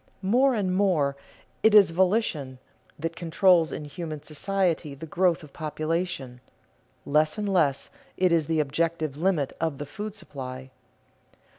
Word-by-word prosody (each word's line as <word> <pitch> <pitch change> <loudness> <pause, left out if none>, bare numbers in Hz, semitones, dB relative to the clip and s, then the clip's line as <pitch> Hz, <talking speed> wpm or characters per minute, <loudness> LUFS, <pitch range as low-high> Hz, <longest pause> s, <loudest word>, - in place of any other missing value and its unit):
More 250 +7 +3
and 190 -4 0
more 170 -8 +2 0.5
it 220 -1 +5
is 200 -5 +7
volition 175 - 0 0.4
that 165 +2 -4
controls 170 0 +3
in 150 - -5
human 155 -1 -6
society 165 -1 -1
the 140 - -8
growth 175 +1 +1
of 145 - -14
population; 155 -4 -3 0.6
less 155 +4 +2
and 210 -1 -2
less 155 -8 +1 0.3
it 185 -1 +3
is 165 -3 +2
the 160 -1 +1
objective 155 0 -1
limit 160 -3 0
of 160 -4 -1
the 145 - -5
food 210 +7 -7
supply. 130 -8 -8
165 Hz, 140 wpm, -26 LUFS, 145-185 Hz, 0.6 s, is